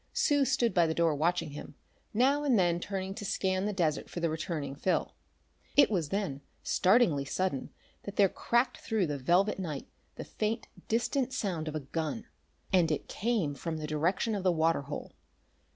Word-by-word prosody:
Sue 285 -2 +3
stood 250 -3 +2
by 175 -3 +4
the 160 - -1
door 165 -2 +3
watching 165 +1 0
him, 145 0 -9 0.4
now 270 +6 +3
and 265 -6 +3
then 175 -2 +3
turning 190 +1 -4
to 205 - -7
scan 190 0 0
the - - 0
desert 165 -6 0
for - - -5
the 170 -2 0
returning 155 -3 -3
Phil. 180 +6 0 0.6
It 285 - +7
was 170 -8 0
then, 190 -9 -2 0.2
startlingly 185 - +3
sudden, 140 0 -2 0.3
that 200 - -8
there 200 - +6
cracked 240 +6 0
through 220 -5 0
the 145 -3 -3
velvet 185 +10 +2
night 155 -7 -4 0.3
the - - -6
faint, 220 +2 -2 0.2
distant 245 +3 0
sound 180 -10 -2
of 155 - -4
a 155 - -2
gun. 160 - -3 0.5
And 175 -4 +4
it 150 - -2
came 210 -9 0
from 160 +3 -4
the 155 - -4
direction 165 +9 0
of 200 - -1
the 185 -1 +3
water 165 -2 +2
hole. 140 +1 -6
180 Hz, 185 wpm, -30 LUFS, 155-215 Hz, 0.6 s, It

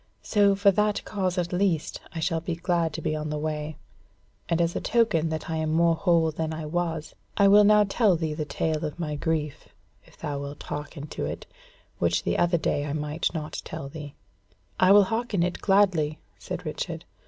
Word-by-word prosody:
So 200 -2 +3
for 200 0 +5
that 210 +1 0
cause 185 -3 -2
at 175 0 -1
least 180 -4 0 0.2
shall 165 0 0
I - - -14
be 165 0 -3
glad 170 -1 0
to - - -5
be 155 - 0
on 155 0 -3
the 150 - -2
way; 150 0 -3 0.7
and 170 -1 +1
as 170 0 +1
a - - -1
token 195 -9 +2
that 160 0 -4
I 160 - -2
am 155 0 -1
more 170 +1 +4
whole 165 -1 +2
than 160 0 -3
I 155 -1 -5
was, 160 -1 -2 0.2
I 200 - +6
will 205 +1 +7
now 210 0 +6
tell 205 -1 +3
thee 160 -2 -2
the 150 - -3
tale 155 +1 -2
of 150 - -4
my 155 -3 -3
grief, 150 -1 -2 0.3
if - - -21
thou 145 -2 -4
wilt 140 +1 -7
hearken 145 0 -6
to - - -4
it, - - -6 0.5
which - - +1
the - - 0
other 175 0 +3
day 145 -2 0
I 145 - -3
might 150 +1 -1
not 155 -1 -4
tell 135 - -6
thee." 145 -1 -9 0.6
"I 185 +1 +6
will 205 0 +8
hearken 225 -2 -1
it 180 0 -2
gladly," 185 -7 +3 0.2
said - - -6
Richard. - - -4
165 Hz, 205 wpm, -26 LUFS, 155-190 Hz, 0.7 s, will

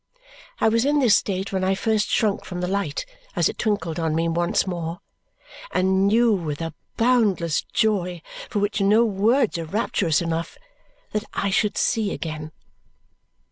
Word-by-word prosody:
I - - +3
was 230 +1 +3
in 290 +2 +2
this 245 -8 +5
state 195 -1 -1
when 190 -1 0
I 190 +1 +2
first 215 +1 0
shrunk 210 -4 +1
from 180 - -6
the 180 - -1
light 190 -6 -2 0.3
as 175 - +3
it - - -5
twinkled 175 -6 -1
on 160 -1 0
me 165 +1 +1
once 170 +1 +1
more, 170 -2 -4 0.7
and 190 +1 +2
knew 230 +2 +4
with 155 -7 -3
a 165 -1 -4 0.2
boundless 210 -10 +2
joy 180 -6 0 0.3
for - - -3
which 205 +1 0
no 210 +4 +4
words 215 0 +2
are 165 - -4
rapturous 170 -4 0
enough 165 -1 -3 0.5
that 210 0 -2
I 200 - 0
should 205 +1 +1
see 220 -4 +1
again. 155 -1 -5
195 Hz, 165 wpm, -23 LUFS, 170-215 Hz, 0.7 s, this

